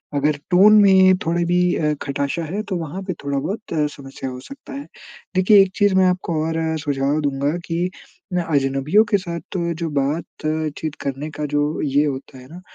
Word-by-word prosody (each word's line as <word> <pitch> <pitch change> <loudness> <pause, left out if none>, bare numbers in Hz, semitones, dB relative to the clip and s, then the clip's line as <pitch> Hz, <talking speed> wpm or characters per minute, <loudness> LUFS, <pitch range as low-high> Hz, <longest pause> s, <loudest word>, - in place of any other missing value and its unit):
अगर 145 +1 +1
टोन 195 +4 +7
में 190 -1 +6
थोड़ा 170 +1 +1
भी 175 +1 +2 0.2
अ, 150 -1 +1
खटाशा 140 +3 -2
है 195 +7 -3
तो 190 - -1
वहाँ 165 +3 -5
पे 185 -1 -3
थोड़ा-बहुत 145 +10 -3 0.2
समस्या 135 -2 -8
हो 125 0 -7
सकता 275 - -11
है। 280 +1 -6 0.5
देखिए 195 +2 +6
एक 190 -1 +2
चीज़ 205 -2 +3
मैं 190 - +5
आपको 180 -2 0
और 160 - -2 0.2
सुझाव 145 0 0
दूँगा 140 0 0
कि 175 +2 -1 0.4
मैं 175 -1 +1
अजनबियों 140 +5 +2
के 205 - +5
साथ 170 0 -6
जो 170 -1 -2
बात-चीत 155 +1 -2
करने 140 +2 -4
का 150 0 -4
जो 145 +1 0
ये 145 +1 +2
होता 135 -2 -5
है 125 - -13
ना, 175 +3 -11
160 Hz, 180 wpm, -21 LUFS, 140-185 Hz, 0.5 s, टोन